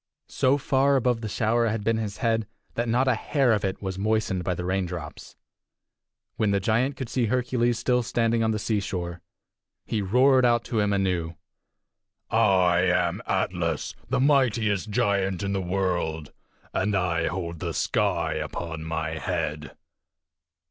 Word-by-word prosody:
So 130 +2 +2
far 140 0 +2
above 125 -3 +1
the 110 - -4
shower 115 +2 +1
had 110 -1 -2
been 115 +1 +1
his 105 -3 -4
head 115 -2 0 0.3
that 120 0 -2
not 125 +3 +2
a 130 - +4
hair 130 +2 +1
of 105 - 0
it 95 +1 -3
was 95 -1 -4
moistened 105 -3 0
by 90 0 -1
the 90 - -4
raindrops. 90 -5 -4 1.0
When 110 - +1
the 100 0 +2
giant 120 +7 0
could 130 - -4
see 120 -1 0
Hercules 120 0 +1
still 125 +1 +1
standing 115 -1 +1
on 110 - +2
the 110 - 0
seashore, 95 -5 -3 0.6
he 110 - -1
roared 130 +6 +4
out 120 -1 +3
to 115 - -2
him 105 -1 +2
anew: 90 -4 0 1.0
"I 95 -6 +4
am 90 -1 +1
Atlas, - - -1 0.2
the - - +1
mightiest 120 -7 +2
giant 100 -2 0
in 100 0 -1
the 95 - 0
world! 90 -5 -2 0.4
And 100 +1 0
I 85 -3 +1
hold 85 -2 -4
the - - -3
sky - - 0
upon 80 -2 -5
my 80 0 -3
head!" - - -3
105 Hz, 155 wpm, -26 LUFS, 90-120 Hz, 1.0 s, a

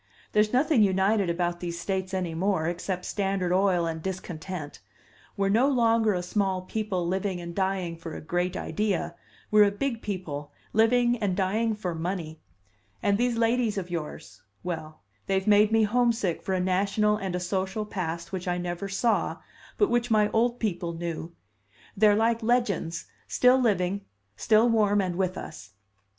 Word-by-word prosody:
There's 210 0 +3
nothing 270 0 +3
united 195 0 +3
about 175 0 -1
these 170 -1 -4
States 190 +1 -2
any 185 -3 -2
more, 180 -1 0
except 180 +1 -3
Standard 195 -3 -1
Oil 185 -2 +3
and 160 -1 -3
discontent. 180 -3 -6 0.6
We're 195 -1 +1
no 235 +7 +4
longer 230 -5 +3
a 180 - -2
small 190 0 -1
people 190 -3 -2
living 190 0 -1
and 170 0 -7
dying 190 -2 -1
for 165 -1 -8
a - - -5
great 175 +3 -1
idea; 210 -4 -1 0.4
we're 210 -1 +7
a - - +3
big 230 +3 -3
people 155 -8 -5 0.2
living 240 +2 +3
and 195 -4 -1
dying 215 +4 +1
for 185 -5 -3
money. 165 -1 -4 0.6
And 200 +1 +2
these 245 -1 +1
ladies 230 -2 +1
of 180 -2 -4
yours 150 - -6 0.2
well, 160 -3 -5 0.3
they 195 - +1
have 190 - 0
made 210 0 +5
me 225 0 +4
homesick 225 -5 +1
for 190 - -2
a - - 0
national 200 +3 +1
and 190 -3 -3
a - - -1
social 190 +3 -2
past 170 -5 -4
which 185 -1 -4
I 175 0 0
never 175 +2 -4
saw, 225 +4 0 0.4
but 410 - +3
which 240 0 +1
my 210 -2 +3
old 240 +2 +1
people 175 -6 -2
knew. 165 0 -5 0.6
They're 210 0 +5
like 230 +2 +2
legends, 205 -8 0 0.2
still 250 +1 +4
living, 200 -4 +1 0.3
still 220 - +4
warm 210 -3 +3
and 185 -3 -1
with 185 0 -1
us. 110 -8 -9
195 Hz, 165 wpm, -27 LUFS, 175-215 Hz, 0.6 s, we're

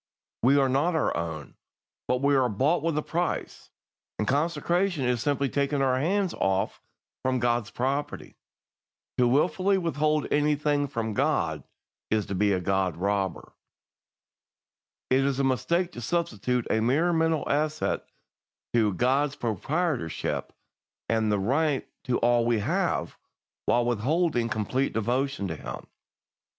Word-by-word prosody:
We 135 +4 +5
are 135 -1 +4
not 145 +7 +1
our 160 - +1
own, 80 -4 -5 0.5
but 125 +1 0
we 140 0 +4
are 130 -2 +3
bought 140 - +1
with 165 -1 -1
a 150 - 0
price, 175 +1 -3 0.5
and 105 - -1
consecration 170 +3 +1
is 125 -2 +1
simply 140 0 +1
taking 140 +1 0
our 130 -1 +2
hands 190 +5 +1
off 95 0 -1 0.4
from 130 0 +1
God's 120 -2 0
property. 135 +4 -3 0.8
To 125 - +5
wilfully 185 +9 +2
withhold 155 -4 0
anything 145 -1 +2
from 115 -5 -3
God 85 - 0 0.5
is 110 -2 +1
to - - -5
be 100 +2 +2
a 95 - +1
God 95 -1 0
robber. 100 -1 -2 1.6
"It 130 - +5
is 135 -1 0
a - - +2
mistake 170 +7 +1
to 120 - -8
substitute 125 - -1
a 110 - +2
mere 150 +10 +2
mental 160 -2 +1
assent 155 +1 0 0.7
to 110 -5 +2
God's 135 +6 +1
proprietorship 125 - -2 0.6
and 110 -1 +2 0.2
right 145 +1 +1 0.2
to 125 - +1
all 120 0 +3
we 120 0 +2
have, 105 - -1 0.5
while 120 0 +3
withholding 120 +2 +1
complete 115 +5 -1
devotion 120 0 -1
to 80 - -3
Him. - - -7
130 Hz, 135 wpm, -27 LUFS, 115-150 Hz, 1.6 s, We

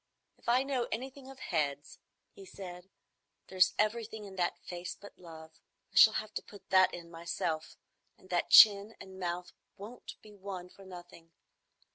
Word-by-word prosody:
"If - - -6
I 250 +2 +4
know 265 -3 -1
anything 265 +3 -6
of 270 - -12
heads," 145 - -3 0.3
he 195 - -13
said, 185 -1 -10 0.6
"there's 185 -1 +3
everything 220 0 -1
in 195 -1 -11
that 175 -1 0
face 175 0 -7
but 205 - -14
love. 160 -2 -12 0.4
I - - -22
shall 220 - +8
have 215 0 -4
to - - -3
put 200 -2 -16
that 185 -1 +6
in 170 -1 -9
myself; 165 -1 -4 0.4
and 185 - -18
that 175 - 0
chin 210 0 +8
and 190 0 -11
mouth 180 0 -4 0.2
won't 215 +5 -10
be 215 - -14
won 190 -3 -8
for 195 +1 -16
nothing. 175 -2 -13
190 Hz, 165 wpm, -32 LUFS, 175-215 Hz, 0.6 s, shall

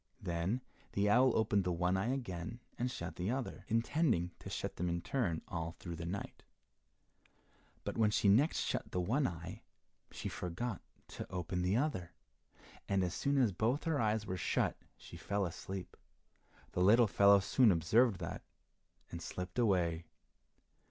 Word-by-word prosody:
Then 85 +8 -1 0.3
the 105 +1 +2
owl 130 +3 +6
opened 105 -3 +2
the 90 - 0
one 90 +2 +1
eye 100 +6 0
again, 110 -4 -4 0.2
and 125 +1 -1
shut 85 -8 -6
the 90 +3 -1
other, 130 +1 -3
intending 115 - +1
to - - -8
shut - - -4
them 90 +1 -1
in 85 0 -2
turn 95 -6 -1
all 80 -1 -4
through 85 -2 -6
the 85 +1 -5
night. 100 +3 -5 1.4
But - - -4
when 110 -2 +5
she 105 - +2
next 125 +11 +4
shut - - -2
the 90 - -1
one 125 +10 +2
eye, 85 -2 -7 0.5
she - - -6
forgot 90 +4 -4 0.3
to - - -7
open 90 0 -2
the 90 +4 +2
other, 105 - -1 0.8
and 100 -1 +2
as 90 -1 -1
soon 140 0 0
as 125 -6 +4
both 115 - 0
her 160 -5 +1
eyes 110 -1 +1
were 95 -2 -3
shut 80 - +1 0.2
she - - -11
fell 100 -1 -1
asleep. 95 +2 -6 0.8
The 90 - -1
little 115 +6 +6
fellow 100 -1 +6
soon 115 +4 +4
observed 100 +7 +3
that, 85 - -4 0.7
and 85 - -6
slipped 90 +5 -5
away. 85 -7 +2
100 Hz, 165 wpm, -35 LUFS, 90-120 Hz, 1.4 s, owl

